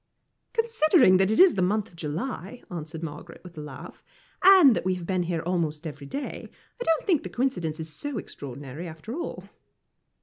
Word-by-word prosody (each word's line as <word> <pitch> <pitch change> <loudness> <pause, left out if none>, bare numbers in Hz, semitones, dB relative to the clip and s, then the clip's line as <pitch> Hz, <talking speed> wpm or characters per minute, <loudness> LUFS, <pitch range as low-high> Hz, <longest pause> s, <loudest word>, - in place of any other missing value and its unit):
"Considering 355 - +4
that 190 +1 +3
it 220 - +1
is 375 -1 +8
the 185 - -1
month 205 +4 +1
of 175 - -20
July," 175 - -5
answered 160 -1 -6
Margaret, 165 +2 -8
with 180 -1 -12
a 155 - -6
laugh, 150 - -10 0.4
"and 365 - +8
that - - -2
we 185 0 +1
have 180 -2 -7
been 185 0 0
here 170 -2 -2
almost 165 -3 -1
every 145 -2 -7
day, 280 - -5 0.3
I - - +1
don't 325 -5 +1
think 345 -8 +3
the - - -7
coincidence 180 - -1
is 160 -1 -5
so 290 - -4
extraordinary, 140 -1 -7
after 165 +8 -8
all." 340 +5 -5
180 Hz, 190 wpm, -26 LUFS, 160-265 Hz, 0.4 s, is